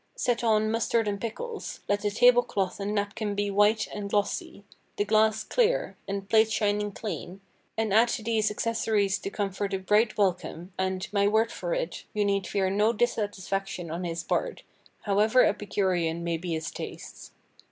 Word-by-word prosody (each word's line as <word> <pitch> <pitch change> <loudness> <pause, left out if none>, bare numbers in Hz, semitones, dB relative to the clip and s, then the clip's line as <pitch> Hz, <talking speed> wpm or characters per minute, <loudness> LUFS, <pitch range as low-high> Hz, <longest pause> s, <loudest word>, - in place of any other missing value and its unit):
Set 245 -1 0
on 215 -1 +3
mustard 230 0 +1
and 200 -1 -2
pickles; 445 - -5
let 205 0 +1
the 210 - 0
table 245 +3 +5
cloth 195 -5 -2
and 205 +1 -2
napkin 205 0 -2
be 205 0 -1
white 210 +2 +3
and 205 -1 -5
glossy; 205 0 -2 0.3
the 205 - +1
glass 215 0 +3
clear, 485 - +1
and 195 0 -4
plate 220 +1 +4
shining 210 -1 0
clean; 195 -3 -6 0.4
and 220 -3 0
add 225 +3 +6
to 230 - -3
these 220 -1 +1
accessories 210 -2 0
to - - -4
comfort 200 -1 -2
a - - 0
bright 210 +4 +2
welcome, 185 -2 -1
and, 190 0 -2
my 200 -1 +3
word 220 +2 +2
for - - -3
it, - - -4
you 210 -1 +2
need 200 -1 0
fear 195 -2 0
no 210 +3 +3
dissatisfaction 195 -6 -2
on 170 +3 -4
his 170 -1 -3
part, - - -2 0.4
however 215 +5 +4
epicurean 180 -5 0
may 170 -1 -1
be 170 +1 -4
his 160 +1 -3
tastes. - - -8
205 Hz, 175 wpm, -27 LUFS, 195-220 Hz, 0.4 s, add